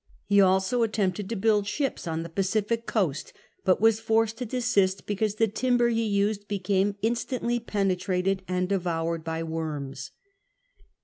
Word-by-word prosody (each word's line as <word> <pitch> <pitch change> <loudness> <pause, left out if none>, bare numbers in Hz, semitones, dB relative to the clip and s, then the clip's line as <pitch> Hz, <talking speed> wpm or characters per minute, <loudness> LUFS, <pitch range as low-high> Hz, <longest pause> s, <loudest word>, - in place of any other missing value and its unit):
>Ie 200 0 +7
also 190 +5 +3
attempted 205 -3 0
to 230 - -2
build 210 0 +2
ships 275 - -2
on 165 0 -2
the - - -6
Pacific 210 +6 -1
coast, 180 - -1 0.3
but 185 - +3
was 225 0 +4
forced 225 0 +1
to 250 - -3
desist, 210 -6 +1
because 210 0 -1
the 225 +1 +2
timber 240 +2 +2
he 230 -1 +1
used 205 -1 0
became 200 0 0
instantly 240 +1 0
penetrated 195 -3 0
and 180 0 0
devoured 170 -4 -1
by 165 0 -3
worms. 150 -4 -4
200 Hz, 145 wpm, -27 LUFS, 180-225 Hz, 0.3 s, >Ie